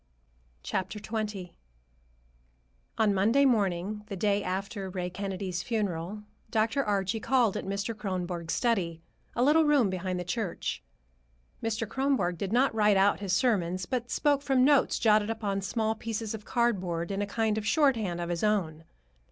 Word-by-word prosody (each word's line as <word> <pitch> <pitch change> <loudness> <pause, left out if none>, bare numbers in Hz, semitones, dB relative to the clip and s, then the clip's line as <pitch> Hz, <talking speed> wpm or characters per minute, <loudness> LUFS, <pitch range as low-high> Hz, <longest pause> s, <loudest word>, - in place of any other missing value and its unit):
XX 210 -1 -3 1.5
On 215 -2 +3
Monday 225 +9 +3
morning, 205 -4 +1
the 200 - -5
day 200 +1 +1
after 195 +1 -3
Ray 180 -1 -4
Kennedy's 190 -1 -3
funeral, 205 -2 -3 0.3
Dr. 225 +5 +1
Archie 205 0 0
called 240 -3 +2
at - - -4
Mr. 200 +3 -2
Kronborg's 180 -5 -3
study, 180 -9 0 0.3
a 240 - +2
little 305 +4 +5
room 285 -9 +3
behind 185 0 -2
the - - -3
church. 180 - -3 0.8
Mr. 225 0 -2
Kronborg 245 - 0
did 195 -1 -3
not 255 +3 +3
write 210 -2 +4
out 200 +1 +3
his 200 -2 -3
sermons, 185 -6 +1
but 245 +1 -3
spoke 290 -2 +2
from 265 -2 +3
notes 285 -2 +4
jotted 215 -1 +3
upon 205 -3 -2
small 220 +3 0
pieces 225 -1 -4
of 215 -1 -7
cardboard 185 -8 0
in 195 +1 -1
a 205 - -1
kind 220 +1 0
of 215 - -5
shorthand 230 - +2
of 170 0 -3
his 175 +1 -2
own. 170 -7 0
205 Hz, 150 wpm, -29 LUFS, 185-225 Hz, 1.5 s, little